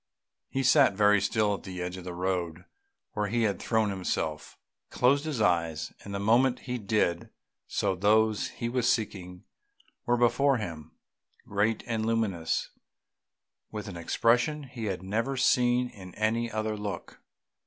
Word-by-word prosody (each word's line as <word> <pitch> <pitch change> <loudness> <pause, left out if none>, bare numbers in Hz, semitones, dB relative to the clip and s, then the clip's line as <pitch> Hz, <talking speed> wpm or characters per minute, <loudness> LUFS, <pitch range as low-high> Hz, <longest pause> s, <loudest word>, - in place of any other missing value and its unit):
He 135 - -1
sat 130 -5 +5
very 105 0 +4
still 105 +1 +1
at 100 - -4
the 90 -1 -7
edge 90 0 -3
of 90 -1 -9
the 90 -1 -6
road 90 -2 -2 0.5
where 105 -1 -1
he 115 +3 0
had 100 -4 0
thrown 110 -3 +1
himself. 80 -5 -3 0.3
He - - -12
closed 140 +4 +3
his 150 -6 -3
eyes, 85 -4 0
and 100 - -8
the 100 - -3
moment 120 +5 +3
he 125 -1 -4
did 100 -5 0 0.4
so 100 -2 0
those 105 +3 +2
he 115 - -5
was 120 0 +2
seeking 90 -5 -3 0.6
were 120 0 +3
before 125 +3 +3
him, 80 -7 -7 0.5
great 105 +2 0
and 115 -2 -2
luminous, 110 -8 -1 1.0
with 105 -2 -6
an 95 - -7
expression 120 - +1
he 125 -4 -7
had 95 -3 -3
never 115 +8 -1
seen 125 -1 +3
in 95 -4 -12
any 115 +2 0
other 110 0 -2
look. 105 -4 -6
105 Hz, 155 wpm, -28 LUFS, 95-120 Hz, 1.0 s, sat